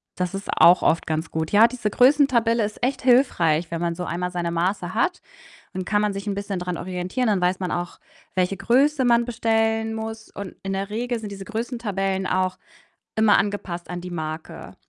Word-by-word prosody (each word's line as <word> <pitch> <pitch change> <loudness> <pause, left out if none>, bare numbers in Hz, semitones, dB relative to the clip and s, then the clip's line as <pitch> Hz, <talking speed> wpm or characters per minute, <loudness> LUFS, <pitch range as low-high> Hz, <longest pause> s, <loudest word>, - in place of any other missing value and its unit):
das 180 0 -2
ist 195 - -6
auch 175 +1 +7
oft 165 - +2
ganz 160 +1 -2
gut. 160 0 -2
Ja, 215 +3 +7
diese 235 -4 -3
Größentabelle 245 -3 +4
ist 210 +3 -5
echt 265 +2 0
hilfreich, 175 - +3
wenn 165 0 -3
man 170 -1 -1
so 180 - -4
einmal 180 +1 -3
seine 175 -1 -2
Maße 180 +1 -1
hat, 355 +11 0 0.5
dann 185 -1 -4
kann 210 -1 +1
man 210 -1 0
sich 195 +1 -6
'n 200 - 0
bisschen 200 -1 -3
dran 180 -1 -3
orientieren, 185 +7 -2
dann 200 -4 +2
weiß 180 +1 +1
man 185 - -3
auch, 175 0 -4 0.4
welche 185 +1 +1
Größe 265 +4 +2
man 235 0 +4
bestellen 225 -1 0
muss. 220 0 -6
Und 200 -2 -8
in 195 0 -3
der 195 +1 -3
Regel 240 +2 -2
sind 210 -2 -7
diese 195 -1 -8
Größentabellen 205 -5 -2
auch 185 0 0 0.6
immer 220 -1 +5
angepasst 195 -4 -3
an 175 0 -5
die 180 - -7
Marke. 155 -1 -6
200 Hz, 195 wpm, -23 LUFS, 180-225 Hz, 0.6 s, auch